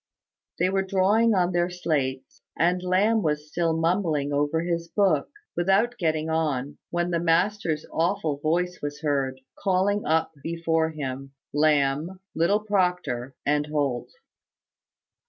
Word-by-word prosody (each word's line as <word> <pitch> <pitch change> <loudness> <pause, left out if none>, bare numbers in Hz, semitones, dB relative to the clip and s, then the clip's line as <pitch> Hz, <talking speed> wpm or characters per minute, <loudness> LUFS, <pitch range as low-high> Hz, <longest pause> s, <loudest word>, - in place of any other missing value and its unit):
They 185 - +2
were 195 0 +2
drawing 200 +4 +3
on 180 -1 +2
their 175 0 +1
slates, 140 -7 -2 0.2
and 180 +2 +2
Lamb 200 +5 +2
was 150 -3 -1
still 165 +1 0
mumbling 165 -4 0
over 145 +3 +1
his 170 -1 -2
book, 195 +2 +2 0.3
without 200 +7 +2
getting 160 -3 0
on, 150 -4 -1
when 175 +1 -1
the 170 - +1
master's 165 -1 +1
awful 165 -3 0
voice 175 +4 0
was 145 0 -5
heard, 135 -3 0 0.2
calling 200 +1 +1
up 160 +1 +2
before 165 0 0
him 135 -3 -6 0.2
Lamb, 150 +3 +2
little 170 +6 +2
Proctor, 180 - -1
and 150 +1 +1
Holt. 145 -5 -1
165 Hz, 130 wpm, -25 LUFS, 150-185 Hz, 0.3 s, drawing